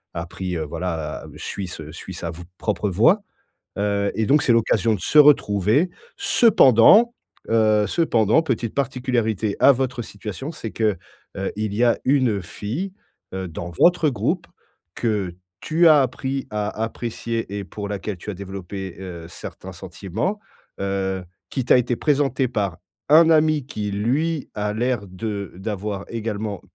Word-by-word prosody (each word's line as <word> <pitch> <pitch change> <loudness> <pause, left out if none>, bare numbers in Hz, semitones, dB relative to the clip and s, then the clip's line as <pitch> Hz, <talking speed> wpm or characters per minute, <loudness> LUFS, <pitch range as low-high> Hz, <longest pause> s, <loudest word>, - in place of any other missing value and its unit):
a 85 +1 -3
pris 90 0 -4
heu, 80 - -2
voilà, 80 -1 -4
heu, - - -13
suis 95 -2 -5
ce 80 -3 -8
suis 95 +3 -9
sa 85 0 -4
v 85 +2 -9 0.2
propre 105 -1 -1
voie. 120 - +4 0.6
Heu 100 0 0
et 110 - +1
donc, 145 +4 +4
c'est 120 - +3
l'occasion 115 -1 +2
de 100 - -2
se 155 - 0
retrouver. 135 - +4 0.3
Cependant, 225 - +6 0.4
heu 110 -2 +3
cependant, 120 - +3
petite 120 -6 -2
particularité 125 -6 0
à 140 - +8
votre 130 -2 -1
situation, 105 - -7
c'est 115 -8 -7
que, 105 -5 0 0.4
heu, 95 - -2
il 105 -1 -2
y 115 +4 +1
a 120 - +3
une 130 -7 +2
fille, 120 - -5 0.4
heu, 95 -1 -3
dans 85 +1 -6
votre 170 - +4
groupe 125 - -1 0.5
que 105 -6 -1 0.3
tu 165 +2 +3
as 150 -3 +7
appris 130 +1 -2
à 105 0 -1
apprécier 115 -2 -4
et 100 - -4
pour 100 +3 -6
laquelle 100 -1 -4
tu 105 - -8
as - - -3
développé, 95 0 -7
heu, 85 -3 -8
certains - - -9
sentiments, 115 - -4 0.4
heu, 95 -1 -1 0.3
qui 130 - -2
t'a - - +6
été 125 -1 +1
présenté 135 -3 +1
par 100 -8 -2 0.3
un 160 +2 +7
ami 155 -3 +3
qui 105 -7 -4
lui 140 +10 -1
a 105 0 -1
l'air 120 -3 -1
de 100 +1 -5
d'avoir 100 0 -4
également 110 -3 -4
110 Hz, 155 wpm, -22 LUFS, 100-130 Hz, 0.6 s, à